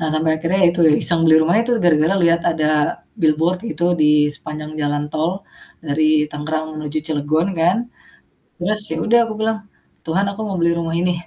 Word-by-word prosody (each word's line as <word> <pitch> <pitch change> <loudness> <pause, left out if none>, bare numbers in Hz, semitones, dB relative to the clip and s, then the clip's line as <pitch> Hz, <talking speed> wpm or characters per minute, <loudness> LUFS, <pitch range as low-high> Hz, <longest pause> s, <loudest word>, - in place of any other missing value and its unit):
Eee, 160 -1 -1
sampai 160 +1 +1
akhirnya 170 +4 -1
ya - - +6
itu 175 0 -4
ya, - - +4
iseng. 170 -2 +2
Beli 160 -1 +5
rumahnya 175 +8 +2
itu 245 - -1
gara-gara 160 +2 +3
liat 170 0 +3
ada 160 -2 -1 0.5
billboard 160 +3 +1
gitu, 160 +3 -3 0.2
di 150 - +4 0.3
sepanjang 150 +1 -8
jalan 145 0 -1
tol 160 +3 -1 0.5
dari 155 +1 0 0.3
Tangerang 155 +2 -3
menuju 155 0 -4
Cilegon, 155 +1 0
kan. 175 +3 +3 0.8
Terus 200 +5 -1
ya - - -2
udah 235 +2 +4
aku 220 - -6
bilang, 220 0 0 0.5
"Tuhan 165 +4 0
aku 200 +2 -9
mau 200 - -4
beli 170 0 +2
rumah 165 -1 -3
ini." 175 +2 +1
165 Hz, 185 wpm, -19 LUFS, 155-175 Hz, 0.8 s, ya